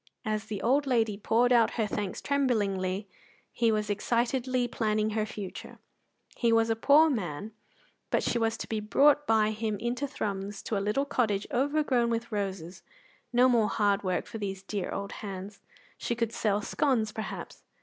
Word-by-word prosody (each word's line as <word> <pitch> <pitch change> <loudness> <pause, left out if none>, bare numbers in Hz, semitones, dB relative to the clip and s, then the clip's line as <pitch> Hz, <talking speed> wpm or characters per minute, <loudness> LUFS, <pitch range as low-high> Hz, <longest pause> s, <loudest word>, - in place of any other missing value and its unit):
As 215 0 -1
the 210 -3 -5
old 275 +4 +2
lady 225 -5 +2
poured 235 +4 +2
out 230 -2 +4
her 225 - +2
thanks 205 -2 -4
tremblingly, 205 -8 0 0.4
he 230 -1 +2
was 215 -1 0
excitedly 245 +4 0
planning 215 -2 0
her 215 0 -1
future. 205 -3 -8 0.6
He 235 -2 +2
was 225 0 +3
a - - +2
poor 290 +7 +6
man, 205 - -3 0.6
but - - +1
she 240 - 0
was 225 0 0
to - - -6
be 220 - -2
brought 285 +7 +3
by 215 -1 +3
him 215 -1 -2
into 240 +6 -2
Thrums 200 -6 -4
to 220 - -2
a 195 - 0
little 210 +8 0
cottage 215 -7 0
overgrown 270 -2 +1
with 230 0 -2
roses. 190 -4 -4 0.5
No 245 +1 +5
more 230 -4 +3
hard 205 -1 +2
work 185 -2 -1
for 225 - -7
these 195 -2 -4
dear 200 -1 -3
old 200 0 -4
hands. 200 0 -7 0.4
She 235 - -2
could 230 -1 -1
sell 210 -2 0
scones, 230 -6 +1
perhaps. 220 0 -6
220 Hz, 170 wpm, -29 LUFS, 205-240 Hz, 0.6 s, poor